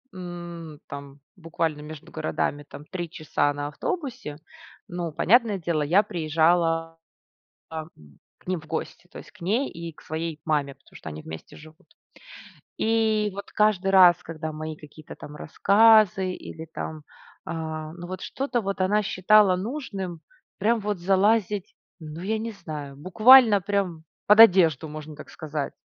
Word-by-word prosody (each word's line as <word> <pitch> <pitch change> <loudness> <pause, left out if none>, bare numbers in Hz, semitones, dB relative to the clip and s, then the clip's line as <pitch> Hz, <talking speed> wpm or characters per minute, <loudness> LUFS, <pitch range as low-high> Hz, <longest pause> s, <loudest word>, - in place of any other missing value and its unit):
М 175 -3 -8
там 140 0 -10
буквально 165 -3 -3
между 155 +1 -10
городами 150 -2 -2
там 145 - -11
3 175 -2 -5
часа 145 -2 -1
на 145 0 -4
автобусе. 240 - -5 0.5
Ну 175 -3 -4
понятное 220 +5 +3
дело, 165 -3 -1
я 180 +8 +4
приезжала 165 0 +1 0.7
там 160 0 -6 0.5
к - - -26
ним 185 -3 -2
в 155 - -16
гости. 165 +2 -5
То - - -11
есть - - -12
к 210 - -22
ней 220 +10 0
и 170 -1 -8
к - - -19
своей 160 0 -5
маме, 145 -3 0
потому - - -25
что - - -8
они 75 +1 -8
вместе 80 0 -10
живут. 155 +4 -16 0.9
И 220 -2 +1
вот 200 +1 -8
каждый 210 -3 +2
раз, 180 -2 +7
когда 160 -1 -6
мои 155 0 -6
какие-то 150 0 -13
там 150 - -11
рассказы 200 0 +4
или 160 -2 -9
там, 155 -1 -7 0.4
а 160 -1 -5
ну 175 0 -9
вот 185 0 -6
что-то 260 -3 -2
вот 195 -2 -3
она 205 +3 +2
считала 200 -1 +4
нужным, 195 - -5 0.4
прям 225 +3 +2
вот 205 -3 -2
залазить 200 +1 +1 0.3
ну 155 +1 -8
я 220 +4 -1
не 225 +1 -4
знаю, 150 -8 -8
буквально 215 - +6
прям 185 -4 -2 0.2
под 210 +1 +6
одежду, 165 - +5
можно 155 0 -8
так - - -12
сказать. 150 -2 -5
175 Hz, 155 wpm, -25 LUFS, 155-200 Hz, 0.9 s, раз